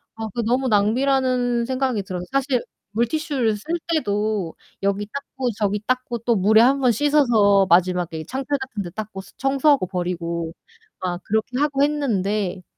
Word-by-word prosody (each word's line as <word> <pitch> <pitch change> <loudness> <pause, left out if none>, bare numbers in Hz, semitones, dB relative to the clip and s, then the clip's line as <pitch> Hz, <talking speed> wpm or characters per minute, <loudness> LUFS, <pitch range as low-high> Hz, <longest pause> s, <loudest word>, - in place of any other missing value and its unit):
아 220 0 -4
그 235 - -1
너무 255 +3 +1
낭비라는 245 +2 +2
생각이 255 -5 -1
들어서 180 -1 -5
사실 275 -2 +1 0.3
물티슈를 240 0 0
쓸 310 +11 -5 0.2
때도 210 - -1 0.3
여기 200 +1 0
닦고 270 -2 -3
저기 205 0 0
닦고 255 -1 -1
또 235 +1 +1
물에 215 +3 +5
1 270 +3 +4
번 255 -2 +4
씻어서 225 -8 +4
마지막에 175 -2 +2
창틀 270 +2 -2
같은 260 -6 -5
데 175 - -6
닦고 210 0 -6 0.2
청소하고 275 - +2
버리고 170 -2 -3 0.5
막 180 -1 -3
그렇게 220 +4 -1
하고 285 -1 +2
했는데 210 -10 0
225 Hz, 305 characters per minute, -22 LUFS, 195-265 Hz, 0.5 s, 물에